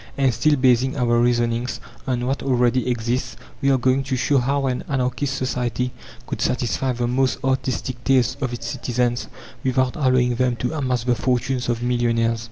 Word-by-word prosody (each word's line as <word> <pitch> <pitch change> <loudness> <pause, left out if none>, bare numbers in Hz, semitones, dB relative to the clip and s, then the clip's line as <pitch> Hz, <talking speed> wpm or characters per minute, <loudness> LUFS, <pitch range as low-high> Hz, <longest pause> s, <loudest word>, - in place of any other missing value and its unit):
And, 135 -3 +3
still 145 +7 +3
basing 130 0 +2
our 120 -2 +2
reasonings 120 0 +1 0.3
on 125 -2 0
what 135 +2 -1
already 125 -1 +2
exists, 120 +1 -1 0.3
we 140 - +2
are 135 - +4
going 130 +2 +2
to 135 -1 -1
show 130 +3 +2
how 135 +2 0
an 125 -1 -1
Anarchist 135 +1 -1
society 125 -1 -1 0.3
could - - -5
satisfy 130 +1 0
the 120 0 -1
most 130 +2 +1
artistic 130 -1 -1
tastes 130 -1 +3
of 130 -3 -1
its 120 - -6
citizens 120 -1 -1 0.4
without 130 -1 +1
allowing 130 -3 +2
them 125 0 +1
to 125 +5 -3
amass 130 -6 -1
the 125 0 +2
fortunes 125 +1 -1
of 120 0 -1
millionaires. 115 -2 +1
125 Hz, 175 wpm, -22 LUFS, 120-130 Hz, 0.4 s, are